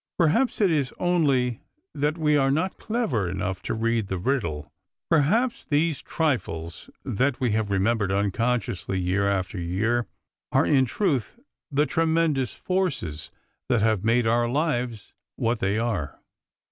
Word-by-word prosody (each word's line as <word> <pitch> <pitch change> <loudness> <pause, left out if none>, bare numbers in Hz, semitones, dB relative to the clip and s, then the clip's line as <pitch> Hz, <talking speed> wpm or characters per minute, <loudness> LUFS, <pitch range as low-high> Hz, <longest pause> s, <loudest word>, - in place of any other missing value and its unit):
Perhaps 215 - +2
it 195 -4 +4
is 140 -5 +1
only 140 -9 +1 0.3
that 150 +2 0
we 150 -2 +2
are 135 -2 +3
not 160 +7 0
clever 185 - -1
enough 95 +1 -3
to - - -3
read 115 -1 0
the 95 - -2
riddle; 85 - -2 0.4
perhaps 210 - +2
these 155 0 0
trifles 85 - -2 0.2
that 130 +5 0
we 125 -3 +1
have 110 -1 0
remembered 100 +1 +1
unconsciously 100 -1 -1
year 95 +2 +1
after 95 -1 -2
year 110 +8 0 0.4
are - - +3
in 135 -3 +4
truth 150 - -1 0.3
the 145 0 +2
tremendous 160 -3 +1
forces 140 - -2 0.4
that 120 -5 +2
have 110 -4 +2
made 115 +2 +3
our 120 +1 +2
lives 125 -6 -2 0.2
what 115 0 0
they 100 +2 0
are. 110 -11 -2
120 Hz, 140 wpm, -25 LUFS, 100-150 Hz, 0.4 s, it